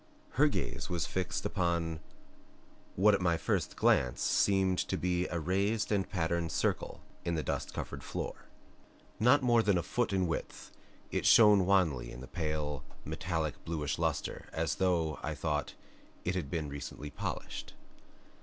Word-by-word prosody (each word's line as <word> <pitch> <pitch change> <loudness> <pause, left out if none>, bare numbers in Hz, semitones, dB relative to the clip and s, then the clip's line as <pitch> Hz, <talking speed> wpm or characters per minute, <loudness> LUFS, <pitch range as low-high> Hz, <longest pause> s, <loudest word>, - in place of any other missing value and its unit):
Her - - +4
gaze - - -3
was 85 -6 -1
fixed 90 +8 -2
upon 85 -2 0 1.0
what 105 +3 +5
at 100 - +2
my 85 -2 +2
first - - -1
glance 60 -1 +3
seemed 95 -2 +2
to - - -1
be 90 0 0
a 85 - -2
raised 100 +7 0
and 100 -2 +1
patterned 85 -3 -1
circle - - -1 0.2
in 85 - -1
the 80 - -1
dust - - -2
covered - - -5
floor. - - -5 0.7
Not 130 +5 +5
more 120 -2 +5
than 100 -4 +3
a 85 - 0
foot 120 -3 0
in 95 -1 +2
width, 80 -2 -4 0.4
it - - 0
shone 105 -5 +7
wanly 85 -11 +2
with 65 - -9
a - - -8
pale, 75 -4 -3 0.2
metallic 80 -2 -3
bluish 75 -3 -2
luster, - - -2
as 80 -3 -1
though, 85 -4 +1
I 75 0 -3
thought, 75 0 -2 0.5
it 90 - +1
had 85 -7 -3
been 80 -1 -2
recently 70 +1 -7
polished. - - -5
85 Hz, 155 wpm, -32 LUFS, 75-95 Hz, 1.0 s, shone